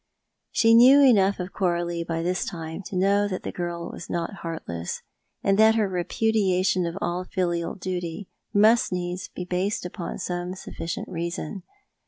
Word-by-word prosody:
She 225 0 +4
knew 255 +5 +8
enough 200 -7 +5
of 180 +1 -5
Coralio 175 -2 -1
by 165 0 -2
this 180 +1 0
time 165 +1 -6
to - - -7
know 200 +2 +3
that 185 -2 -4
the - - -4
girl 175 -1 -4
was - - -9
not 170 +4 -3
heartless, 90 - -5 0.4
and 195 +1 +2
that 220 0 +6
her 215 -2 +2
rejtudiation 185 -1 +1
of 170 +2 -5
all 180 -3 -2
filial 175 -2 -2
duty 180 0 -4 0.2
must 220 +3 +4
needs 180 +1 -3
be 180 - -7
based 180 +2 -1
upon 175 -1 -5
some 180 +1 -3
sufficient 165 -3 -5
reason. 170 +1 -4
180 Hz, 160 wpm, -25 LUFS, 170-200 Hz, 0.4 s, knew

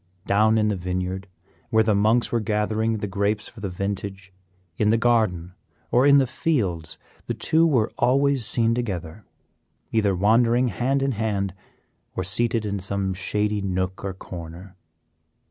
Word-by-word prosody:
Down 110 +2 +3
in 105 -1 +2
the 105 - 0
vineyard, 90 +1 -3 0.4
where 110 0 +4
the 110 -1 +2
monks 110 +4 +2
were 120 - +1
gathering 110 +1 0
the 105 - -3
grapes 100 +2 -1
for 115 - -13
the 100 -2 -4
vintage, 95 0 -5 0.4
in 105 +3 +1
the 115 - +4
garden, 110 -7 +1 0.4
or 125 +3 +4
in 140 0 +7
the 135 - +4
fields, 100 - -1 0.3
the - - -2
two 165 +1 +2
were 120 -8 +2
always 135 +1 +3
seen 115 +1 +2
together, 100 -5 -4 0.7
either 105 -4 +2
wandering 115 +5 +3
hand 130 +7 0
in 135 - +1
hand, 105 -4 -1 0.6
or - - -1
seated 115 -2 0
in 100 -1 -2
some 95 0 -1
shady 105 +2 -1
nook 95 -1 -2
or 95 -1 -4
corner. 90 +1 -9
105 Hz, 155 wpm, -24 LUFS, 95-115 Hz, 0.7 s, in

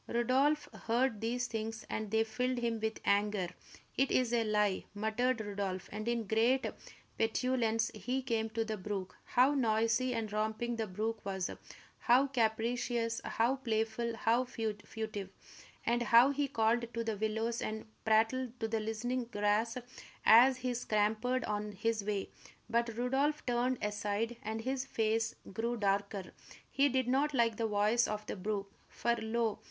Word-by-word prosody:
Rodolph 265 +6 +2 0.2
heard 235 -1 +1
these 245 +2 -1
things, 225 -1 -4
and 220 -1 -3
they 220 +1 +3
filled 250 +3 -1
him 235 -2 -1
with 220 0 -2
anger. 200 -3 +2 0.5
"It 270 +1 +2
is 245 -2 +2
a 235 -1 +3
lie!" 210 -3 +1
muttered 220 +4 0
Rodolph; 200 -3 -3
and 215 +2 -5
in 235 -1 0
great 230 +6 +2 0.5
petulance 225 0 +1
he 260 +2 -2
came 225 -3 -1
to 225 +1 -1
the 220 -1 -3
brook. 190 -1 -4
How 255 +3 +4
noisy 235 0 +2
and 220 -2 -3
romping 220 +3 -1
the 220 -1 -1
brook 215 +4 -3
was; 190 -2 -2 0.5
how 250 +3 +5
capricious, 230 -1 0
how 240 +4 +1
playful, 230 -1 -1
how 230 +3 +2
furtive! 215 -3 -4 0.6
And 240 +1 +2
how 240 +3 +6
he 285 0 0
called 235 -1 +1
to 230 - -1
the 220 -2 -2
willows 220 +2 -1
and 220 0 -4 0.2
prattled 230 +3 +2
to 225 - -1
the 220 0 -1
listening 235 +3 -2
grass 215 +1 0 0.5
as 250 +4 +8
he 255 -1 -2
scampered 220 +2 0
on 210 0 -3
his 220 +1 -1
way. 205 -1 -2 0.4
But 235 -1 0
Rodolph 270 +5 +1
turned 245 +1 +1
aside 210 +3 -1
and 220 +1 -3
his 260 +2 -1
face 225 -2 0 0.2
grew 235 +4 -1
darker. 200 -2 -1 0.4
He 280 +1 +3
did 260 -1 +1
not 275 +3 +2
like 230 -3 +2
the 230 - 0
voice 215 +3 +3
of 210 0 -4
the - - -4
brook; 200 0 -3 0.2
for, 235 0 0
lo! 220 -1 -1
225 Hz, 155 wpm, -33 LUFS, 215-245 Hz, 0.6 s, as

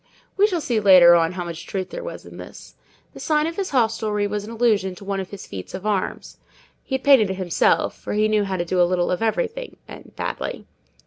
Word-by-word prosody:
We 405 +1 +4
shall 355 -5 -2
see 240 -6 0
later 185 -4 +8
on 165 0 +3
how 180 -1 -5
much 170 -1 -8
truth 190 -2 -4
there - - -6
was - - -8
in - - -12
this. - - -11 0.4
The - - -11
sign 305 -1 +1
of 330 +1 -4
his 390 0 -3
hostelry 220 -5 0
was 205 0 -3
in 210 - -9
allusion 220 -5 +1
to 195 - -13
one 195 0 -2
of 190 - -5
his 200 -2 -9
feats 95 -2 -8
of 195 - -8
arms. 205 -3 -3 0.4
He 265 - -3
had 265 - -4
painted 265 -8 +5
it 190 - -2
himself; 185 -3 +1
for - - -5
he 215 +1 +2
knew 215 -1 +2
how 190 -1 -3
to 175 - -2
do 180 +1 +1
a 175 - +3
little 180 -1 0
of 180 - -2
everything, 470 - -2
and - - -13
badly. - - -5
205 Hz, 240 wpm, -22 LUFS, 185-245 Hz, 0.4 s, later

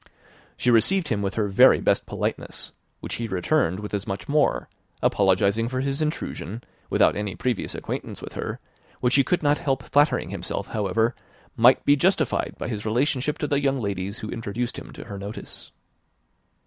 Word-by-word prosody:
She 125 - +2
received 160 - +3
him 105 -3 0
with 100 0 -2
her 105 -2 +1
very 95 - +6
best - - +1
politeness, - - -4 0.3
which - - -5
he 115 - -2
returned 95 - +1
with 105 0 -7
as 100 -1 -2
much 95 - -4
more, 140 - +2 0.4
apologizing 100 +3 +3
for 130 +1 -2
his 135 +2 -1
intrusion, 120 - -3 0.3
without - - +4
any 105 -1 -3
previous 125 -5 -2
acquaintance - - -5
with - - -9
her, - - -4 0.4
which 125 0 +1
he 140 - +5
could 175 +5 0
not 145 0 +3
help 135 -2 -1
flattering 145 +1 +2
himself, - - -4
however, 110 +3 0 0.4
might 125 +1 +5
be 145 - +6
justified 160 -2 +1
by - - -4
his 105 -3 -4
relationship 130 +6 0
to 150 - -2
the 140 -1 +1
young 135 -1 +1
ladies 100 -1 -3
who 110 - -6
introduced 115 +2 -3
him - - -11
to - - -9
her 100 -1 -7
notice. 100 +2 -8
115 Hz, 175 wpm, -25 LUFS, 100-140 Hz, 0.4 s, very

